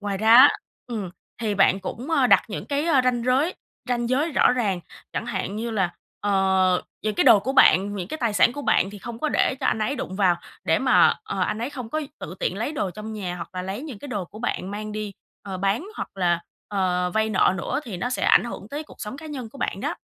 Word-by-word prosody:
ngoài 200 -2 -3
ra 220 +2 +5
á, 265 +3 +10 0.4
ừm, 210 -7 -4 0.3
thì 210 -2 0
bạn 195 -1 +4
cũng, 255 - -6
ơ, 275 -5 +4
đặt - - +6
những 205 - -5
cái, 285 +2 -1
ơ, 290 -6 +4
ranh 240 -2 +1
giới 270 +8 +2 0.3
ranh 240 -1 0
giới 290 +5 +1
rõ - - +4
ràng. 205 -8 0 0.3
Chẳng - - -3
hạn 210 -4 -3
như 230 +1 -3
là, 190 -5 0 0.3
ờ, 190 -2 +2 0.2
những 215 -1 -1
cái - - +2
đồ 230 -6 +7
của 260 +7 -2
bạn, 205 -6 +5
những 180 0 -5
cái 315 - -4
tài 235 -4 0
sản 205 +4 +4
của 290 +2 -6
bạn 190 - +2
thì 205 - -10
không 230 +3 -7
có 310 - 0
để 275 - +2
cho - - 0
anh - - +1
ấy 255 +6 -1
đụng 190 -5 -5
vào, 185 -4 +3 0.3
để - - +3
mà, - - +5
ờ, 430 - -4
anh 215 - 0
ấy 240 +5 -3
không 250 -6 -7
có 310 - -1 0.2
tự 170 - -7
tiện 185 - -1
lấy 235 +8 -2
đồ 205 -10 -2
trong 215 +3 -7
nhà, 185 -4 -4
hoặc 170 - -7
là 180 - -3
lấy 195 +8 -5
những 270 -10 -7
cái 285 - -9
đồ 205 -6 -3
của 205 +5 -13
bạn 200 -4 -3
mang 210 +1 -5
đi, 210 -1 -4 0.3
ờ, 195 -2 -5
bán 200 - 0
hoặc - - -4
là, 175 -3 +1 0.3
ờ, 180 -3 0
vay 220 0 +1
nợ 190 -2 +3
nữa, 190 - -2
thì 210 -7 -6
nó 245 +8 -3
sẽ - - -2
ảnh - - +5
hưởng 225 -3 -7
tới 295 +2 -4
cuộc - - -16
sống 225 +4 -5
cá 315 - -10
nhân 265 -7 -6
của 275 - -13
bạn - - -2
đó. - - -2
215 Hz, 260 wpm, -24 LUFS, 195-255 Hz, 0.4 s, á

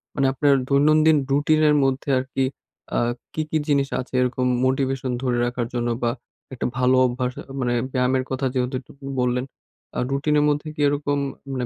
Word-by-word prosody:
মানে 135 - +2
আপনার 140 +1 +3 0.2
দৈনন্দিন 155 +2 +5
রুটিনের 150 +1 +3
মধ্যে 135 +1 -1
আরকি 130 +1 -2 0.5
আ - - +3 0.3
কি, 155 - -1
কি 160 - +1
জিনিস 140 -2 +2
আছে 130 - -7
এরকম 125 0 0 0.2
মোটিভেশন 130 0 0
ধরে 125 -2 +1
রাখার 120 -1 -2
জন্য? 120 0 0
বা 120 - +2 0.4
একটা 125 - -3
ভালো 125 +1 +3
অভ্যাস 125 0 -1 0.3
মানে 120 -2 0 0.2
ব্যায়ামের 130 0 +1
কথা 130 +1 -2
যেহেতু 130 0 -1
একটু - - -18 0.3
বললেন, 125 +1 0 0.5
আ - - +1
রুটিনের 150 +2 +2
মধ্যে 145 +2 -1
কি - - -14
এরকম 145 0 0 0.3
মানে 130 -2 -2
135 Hz, 165 wpm, -23 LUFS, 125-145 Hz, 0.5 s, দৈনন্দিন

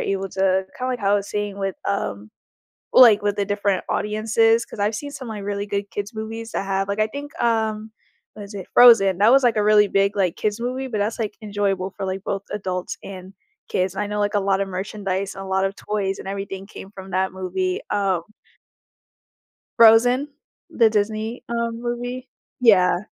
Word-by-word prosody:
able 195 0 -2
to 190 0 +1
kinda 255 +1 -3
like 250 - -2
how 200 -1 +1
I - - +5
was 200 0 -1
saying 205 -1 -3
with, 195 -1 -2
um, 105 - -3 0.6
like 230 -5 +8
with 205 -1 0
the 200 - -1
different 205 -1 0
audiences, 225 +2 +2
'cause - - -11
I've 210 +2 0
seen 285 +5 -6
some 260 -3 -8
like 215 -3 -6
really 200 0 -3
good 200 -1 -3
kids 205 +2 -5
movies 225 +1 -6
that - - -2
have 195 0 -1
like, 200 +1 -3
I 215 - +3
think, 285 +5 -8
um, 220 -2 0 0.4
what 210 - -9
is 200 +1 -11
it? 195 -2 -7
Frozen. 225 -7 +7
That 210 +4 +5
was 270 +1 +5
like 235 -3 +3
a 210 - +2
really 210 0 +5
big, 195 0 +1
like, 185 -4 +1
kids 210 +1 -2
movie 255 +2 -3
but 220 -5 -3
that's 210 +3 -1
like 215 -2 -3
enjoyable 200 -3 -1
for 195 - -3
like 190 0 -4
both 195 -1 -3
adults 185 -3 -4
and 190 -1 -9 0.3
kids. 185 0 -1
And 210 - -1
I 205 - -4
know 210 0 -3
like 205 +1 0
a - - +4
lot 195 0 +1
of 195 - -1
merchandise 195 0 -3
and 195 - -7
a - - -8
lot 190 0 +1
of 195 0 -3
toys 200 -2 -3
and - - -8
everything 195 0 -5
came 195 -1 -11
from 190 -1 -11
that 190 0 0
movie. 185 0 -2
Um 195 -4 0 1.6
Frozen. 245 +5 +6 0.4
The 230 -2 +4
Disney, 215 +2 -2
um, 235 0 -2
movie. 245 +1 -4 0.3
Yeah. 195 -4 +4
205 Hz, 205 wpm, -22 LUFS, 195-220 Hz, 1.6 s, like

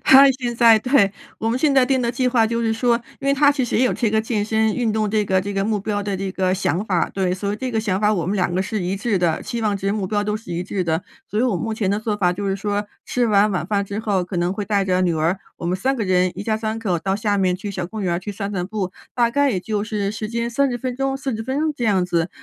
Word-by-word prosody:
他 275 +1 +8
现 245 -2 -4
在 230 -1 +6
对， 220 -4 +3 0.3
我 225 - -1
们 240 +3 0
现 285 -1 +2
在 255 -2 +5
定 260 -1 +1
的 235 0 0
计 250 +1 +1
划 235 -3 +3
就 230 +1 -1
是 225 -1 +1
说 235 +1 +2 0.2
因 275 - -6
为 275 - +4
他 285 +1 +5
其 280 -3 0
实 240 - 0
也 255 - +4
有 - - +1
这 230 -4 0
个 220 0 +2
健 220 -2 -1
身 220 0 +1
运 235 -3 +1
动 215 -1 0
这 215 -1 +1
个 190 -1 +2
这 200 +2 -5
个 195 0 0
目 215 -1 0
标 205 0 -2
的 200 -1 -2
这 190 0 -3
个 185 -1 0
想 185 0 -1
法。 180 -5 +1
对， 185 -2 -1
所 200 +2 -2
以 205 - -2
这 255 +2 -3
个 225 - 0
想 195 -4 0
法 210 0 +3
我 175 -5 -1
们 200 +3 0
两 180 -2 0
个 185 - +1
是 205 0 -2
一 180 +2 -1
致 200 0 0
的， 170 -3 +1
期 235 -1 -4
望 210 -2 +1
值 195 0 -1
目 200 -2 -1
标 205 +1 0
都 210 +1 -1
是 215 -5 -8
一 170 +1 -2
致 185 0 -2
的。 160 +1 0 0.3
所 210 - 0
以 - - +2
我 245 -7 +1
目 225 +5 -3
前 210 -3 -1
的 205 - +1
做 215 -1 -2
法 185 -4 +2
就 200 +3 -3
是 195 - +1
说 205 +1 -2 0.2
吃 245 -1 +1
完 210 -1 +4
晚 180 -5 -2
饭 200 0 +1
之 200 +2 -4
后， 205 -4 0
可 180 +1 -5
能 175 +1 +1
会 205 +1 -3
带 200 -1 +1
着 185 -1 +1
女 175 -2 +2
儿 165 +4 0 0.2
我 - - -8
们 175 +2 0
3 265 +8 0
个 225 - -1
人， 185 -1 +2
一 - - -3
家 215 +1 -1
三 220 0 -3
口 190 -7 -1
到 190 +3 -1
下 205 -1 0
面 185 -2 +2
去 200 +2 -6
小 185 -3 -4
公 215 +2 -6
园 180 -2 0
儿 170 - 0
去 195 +3 -6
散 200 0 -4
散 180 -3 -2
步， 195 -3 -3 0.2
大 235 -1 +2
概 285 +2 +2
也 195 - 0
就 210 +1 -2
是 210 -2 -2
时 215 -1 -4
间 235 +1 -2
30 255 0 +1
分 250 0 -4
钟、 270 +1 -1
40 265 -5 -3
分 260 +4 -2
钟 310 0 +1
这 240 - -3
样 190 -4 +3
子。 170 -2 0
210 Hz, 325 characters per minute, -21 LUFS, 190-235 Hz, 0.3 s, 他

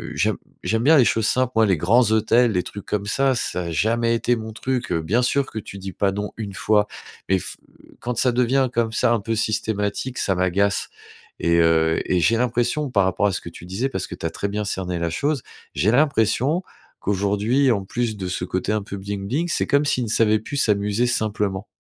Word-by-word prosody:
j'aime - - +1 0.3
j'aime 110 +5 0
bien 155 +4 +6
les 125 - +6
choses 110 -2 +1
simples, 130 0 +1
moi 110 - +5
les 95 -4 +2
grands 110 +7 +3
hôtels, 115 +2 +3
les 90 -3 +1
trucs 100 - -9
comme 100 -1 -2
ça, 135 +5 +2
ça 90 -6 -2
a 85 - -4
jamais 115 +8 +1
été 120 +1 +1
mon 110 -1 -6
truc, 125 +2 -3
heu, 80 - +1
bien 100 +10 +1
sûr 135 +3 +1
que - - -8
tu 100 - -9
dis 95 0 -6
pas 100 +2 +1
non, 105 +1 -4
1 105 -3 -5
fois 105 +2 +2 0.4
mais 95 0 +3
f - - -6 0.3
heu, - - -19
quand 125 -1 -3
ça 125 +1 +3
devient 130 +2 +2
comme 115 -1 0
ça 120 - +2
un 115 - +1
peu 115 +2 -2
systématique, 110 +2 -2
ça 95 - 0
m'agace, 95 +3 +1 0.5
et 85 0 +2
heu, 80 -1 +3
et 90 - +1
j'ai 100 +7 +3
l'impression 125 +4 0
par 100 -5 +3
rapport 95 +2 +1
à 100 - +1
ce - - -2
que 85 - -8
tu 85 - -12
disais, 95 +9 -2
parce 95 -8 -3
que - - -7
tu - - -8
as - - +1
très 100 - -3
bien 105 +1 -2
cerné 90 -3 -3
la 85 - -1
chose, 140 - -1 0.3
j'ai 105 +6 +2
l'impression 135 - +2 0.4
qu'aujourd'hui 105 +7 +1
en 100 -4 0
plus 115 +1 -2
de 95 -2 -4
ce 90 0 -3
côté 90 +2 -2
un 110 - 0
peu 100 - -7
bling-bling, 100 - -3
c'est - - 0
comme 140 +1 +3
s'ils 130 -3 +1
ne - - -5
savaient 110 -1 +3
plus 140 +6 -6
s'amuser 105 -1 +1
simplement. 105 -4 -1
110 Hz, 230 wpm, -22 LUFS, 95-120 Hz, 0.5 s, bien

